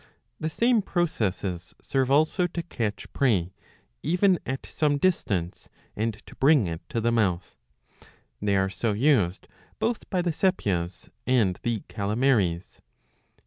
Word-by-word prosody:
^* -, -, -27 dB, 0.4 s
The 155 Hz, -, -2 dB
same 235 Hz, +6 st, +3 dB
processes 100 Hz, -, -2 dB
serve 135 Hz, -2 st, 0 dB
also 155 Hz, +6 st, +3 dB
to 170 Hz, -1 st, -5 dB
catch 115 Hz, -10 st, -4 dB
prey 95 Hz, -10 st, +1 dB, 0.5 s
even 180 Hz, +1 st, +3 dB
at 130 Hz, 0 st, -3 dB
some 145 Hz, -2 st, 0 dB
distance 100 Hz, -, -1 dB, 0.3 s
and 110 Hz, 0 st, -1 dB
to -, -, -13 dB
bring 140 Hz, -4 st, +5 dB
it 85 Hz, -1 st, -4 dB
to 115 Hz, -, -1 dB
the 120 Hz, +1 st, +2 dB
mouth. 95 Hz, -6 st, 0 dB, 0.9 s
They 100 Hz, -1 st, +2 dB
are 95 Hz, 0 st, +2 dB
so 110 Hz, +1 st, -1 dB
used 105 Hz, -, +2 dB, 0.3 s
both 230 Hz, 0 st, -2 dB
by 180 Hz, -3 st, 0 dB
the 175 Hz, -, +1 dB
Sepias 95 Hz, -, -1 dB, 0.2 s
and 115 Hz, -8 st, +2 dB
the 115 Hz, -3 st, -2 dB
Caletmaries. 105 Hz, -4 st, 0 dB
115 Hz, 140 wpm, -26 LUFS, 95-155 Hz, 0.9 s, bring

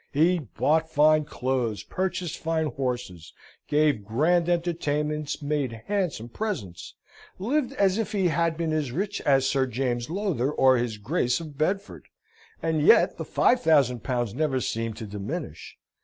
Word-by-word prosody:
He 170 Hz, +5 st, +3 dB
bought 160 Hz, +4 st, 0 dB
fine 155 Hz, 0 st, +4 dB
clothes, 125 Hz, -6 st, -2 dB
purchased 185 Hz, -3 st, -3 dB
fine 160 Hz, -1 st, 0 dB
horses, 120 Hz, -, -4 dB, 0.3 s
gave 145 Hz, -7 st, +2 dB
grand 165 Hz, -, +2 dB
entertainments, 150 Hz, -4 st, -1 dB
made 140 Hz, -6 st, -2 dB
handsome 180 Hz, -, -2 dB
presents, 120 Hz, -, -5 dB, 0.4 s
lived 260 Hz, +6 st, -1 dB
as 200 Hz, -5 st, +2 dB
if 225 Hz, -, -2 dB
he 190 Hz, -4 st, +1 dB
had 165 Hz, +1 st, 0 dB
been 165 Hz, -2 st, -1 dB
as 150 Hz, -5 st, -1 dB
rich 195 Hz, +8 st, -2 dB
as 135 Hz, -2 st, +4 dB
Sir 135 Hz, -1 st, +1 dB
James 120 Hz, -1 st, -2 dB
Lowther, 170 Hz, -, -1 dB
or 130 Hz, -3 st, +4 dB
his 120 Hz, -2 st, -2 dB
Grace 125 Hz, -, 0 dB
of 155 Hz, -3 st, -9 dB
Bedford, 190 Hz, +7 st, -2 dB, 0.6 s
and 160 Hz, -2 st, +1 dB
yet 150 Hz, -, +5 dB
the -, -, -5 dB
five 250 Hz, -, +2 dB
thousand 140 Hz, -7 st, +3 dB
pounds 120 Hz, -5 st, -1 dB
never 140 Hz, -1 st, 0 dB
seemed 115 Hz, -2 st, -3 dB
to 110 Hz, -, -6 dB
diminish. 100 Hz, -1 st, -6 dB
150 Hz, 150 wpm, -26 LUFS, 125-170 Hz, 0.6 s, yet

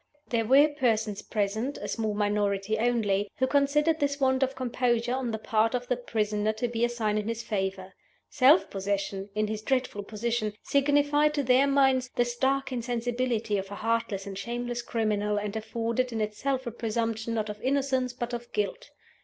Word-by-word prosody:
There 230 Hz, -2 st, +1 dB
were 275 Hz, +4 st, +7 dB
persons 225 Hz, -8 st, 0 dB
present 220 Hz, +6 st, -2 dB
(a -, -, -6 dB
small 220 Hz, -2 st, -2 dB
minority 205 Hz, 0 st, 0 dB
only) 210 Hz, -4 st, +1 dB
who 260 Hz, -, +2 dB
considered 295 Hz, +4 st, +2 dB
this 285 Hz, -1 st, 0 dB
want 260 Hz, -1 st, +2 dB
of 265 Hz, 0 st, +1 dB
composure 245 Hz, -1 st, 0 dB
on 260 Hz, -2 st, -1 dB
the 220 Hz, -, -2 dB
part 220 Hz, +2 st, +1 dB
of 245 Hz, 0 st, -3 dB
the 250 Hz, -, +2 dB
prisoner 215 Hz, -3 st, -1 dB
to 220 Hz, +3 st, -2 dB
be 235 Hz, 0 st, -2 dB
a 240 Hz, -, +3 dB
sign 215 Hz, -3 st, 0 dB
in 210 Hz, -, -4 dB
his 230 Hz, 0 st, -3 dB
favor. 190 Hz, -2 st, -3 dB, 0.3 s
Self 290 Hz, +5 st, +4 dB
possession, 195 Hz, 0 st, -2 dB
in 215 Hz, 0 st, +1 dB
his 215 Hz, 0 st, -4 dB
dreadful 255 Hz, -3 st, -1 dB
position, 215 Hz, +1 st, -2 dB
signified, 290 Hz, +1 st, +3 dB
to 285 Hz, -, +1 dB
their 255 Hz, +2 st, +4 dB
minds, 265 Hz, -2 st, +3 dB
the 240 Hz, -, +3 dB
stark 265 Hz, +3 st, 0 dB
insensibility 240 Hz, -3 st, -1 dB
of 190 Hz, 0 st, -6 dB
a 200 Hz, -, -6 dB
heartless 225 Hz, -3 st, -1 dB
and 200 Hz, -1 st, -6 dB
shameless 240 Hz, +3 st, -3 dB
criminal, 210 Hz, -3 st, 0 dB
and 205 Hz, 0 st, -3 dB
afforded 230 Hz, +3 st, -1 dB
in 225 Hz, -, -3 dB
itself 255 Hz, +5 st, -2 dB
a 235 Hz, -, -3 dB
presumption, 225 Hz, 0 st, -2 dB
not 215 Hz, -1 st, -1 dB
of 210 Hz, 0 st, -7 dB
innocence, 265 Hz, -1 st, +1 dB
but 245 Hz, 0 st, -5 dB
of 240 Hz, 0 st, -6 dB
guilt. 215 Hz, -, -2 dB
235 Hz, 180 wpm, -28 LUFS, 210-260 Hz, 0.3 s, were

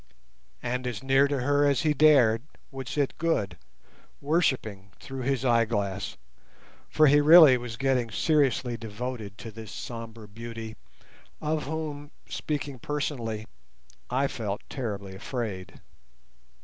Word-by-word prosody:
And 125 Hz, +1 st, -2 dB
as 125 Hz, 0 st, -4 dB
near 135 Hz, +1 st, +4 dB
to 140 Hz, -2 st, -1 dB
her 145 Hz, +2 st, +3 dB
as 140 Hz, -2 st, +2 dB
he 155 Hz, -2 st, +2 dB
dared 130 Hz, -7 st, +5 dB, 0.3 s
would 135 Hz, -2 st, -7 dB
sit 140 Hz, +1 st, -1 dB
Good, 110 Hz, -, 0 dB, 0.6 s
worshipping 130 Hz, -, 0 dB
through 135 Hz, -1 st, -7 dB
his 135 Hz, 0 st, -1 dB
eyeglass, 110 Hz, -5 st, 0 dB, 0.7 s
for 155 Hz, -, +4 dB
he 145 Hz, 0 st, +6 dB
really 155 Hz, -3 st, +9 dB
was 120 Hz, -2 st, -5 dB
getting 130 Hz, -3 st, +1 dB
seriously 135 Hz, -1 st, +1 dB
devoted 110 Hz, -2 st, -6 dB
to 115 Hz, -, -8 dB
this 110 Hz, -1 st, -10 dB
sombre 115 Hz, -2 st, -7 dB
beauty, 115 Hz, +1 st, -8 dB, 0.6 s
of 155 Hz, -1 st, -1 dB
whom, 150 Hz, -1 st, -5 dB, 0.2 s
speaking 145 Hz, -3 st, -4 dB
personally, 120 Hz, -7 st, -3 dB, 0.6 s
I 130 Hz, +3 st, +1 dB
felt 105 Hz, -6 st, -4 dB
terribly 100 Hz, -7 st, -4 dB
afraid. 95 Hz, -3 st, -5 dB
125 Hz, 125 wpm, -27 LUFS, 110-145 Hz, 0.7 s, really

